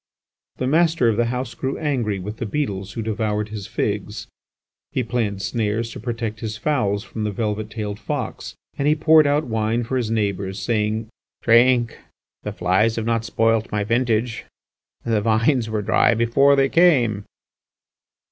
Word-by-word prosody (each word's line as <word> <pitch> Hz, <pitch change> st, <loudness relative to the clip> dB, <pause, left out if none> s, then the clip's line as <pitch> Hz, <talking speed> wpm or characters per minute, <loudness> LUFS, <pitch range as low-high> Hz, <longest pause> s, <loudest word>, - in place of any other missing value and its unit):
The 130 Hz, -, -3 dB
master 160 Hz, -3 st, +3 dB
of 110 Hz, -, 0 dB
the 120 Hz, -, +2 dB
house 125 Hz, 0 st, -3 dB
grew 130 Hz, +3 st, -3 dB
angry 125 Hz, -9 st, -1 dB
with 105 Hz, +4 st, -6 dB
the 115 Hz, -, -4 dB
beetles 100 Hz, -7 st, -3 dB
who 115 Hz, -, -4 dB
devoured 105 Hz, -1 st, -2 dB
his 105 Hz, -3 st, -6 dB
figs; -, -, -3 dB, 0.7 s
he 130 Hz, -, -1 dB
planned 110 Hz, -4 st, -2 dB
snares 115 Hz, +2 st, -1 dB
to -, -, -8 dB
protect 115 Hz, -2 st, -4 dB
his 110 Hz, -1 st, -5 dB
fowls 105 Hz, -5 st, 0 dB
from 110 Hz, -2 st, -6 dB
the 105 Hz, -, 0 dB
velvet 105 Hz, 0 st, -3 dB
tailed 105 Hz, -2 st, -5 dB
fox, -, -, -5 dB, 0.2 s
and 140 Hz, -, +1 dB
he 150 Hz, -, +4 dB
poured 155 Hz, -1 st, +5 dB
out 145 Hz, +2 st, +2 dB
wine 115 Hz, -1 st, -1 dB
for 130 Hz, +3 st, -2 dB
his 120 Hz, -4 st, -1 dB
neighbours 100 Hz, -3 st, -1 dB
saying: 110 Hz, +2 st, -1 dB, 0.4 s
"Drink! 120 Hz, 0 st, +4 dB, 0.4 s
The -, -, -4 dB
flies 95 Hz, +6 st, +1 dB
have 115 Hz, -, -3 dB
not 115 Hz, -1 st, 0 dB
spoilt 115 Hz, -1 st, +1 dB
my 105 Hz, -1 st, 0 dB
vintage; 115 Hz, +1 st, 0 dB, 0.6 s
the 110 Hz, -2 st, +1 dB
vines 115 Hz, +3 st, +2 dB
were 110 Hz, -1 st, -2 dB
dry 115 Hz, +2 st, +3 dB
before 120 Hz, +5 st, +4 dB
they 135 Hz, -1 st, +3 dB
came." 130 Hz, -, +3 dB
115 Hz, 165 wpm, -22 LUFS, 105-125 Hz, 0.7 s, poured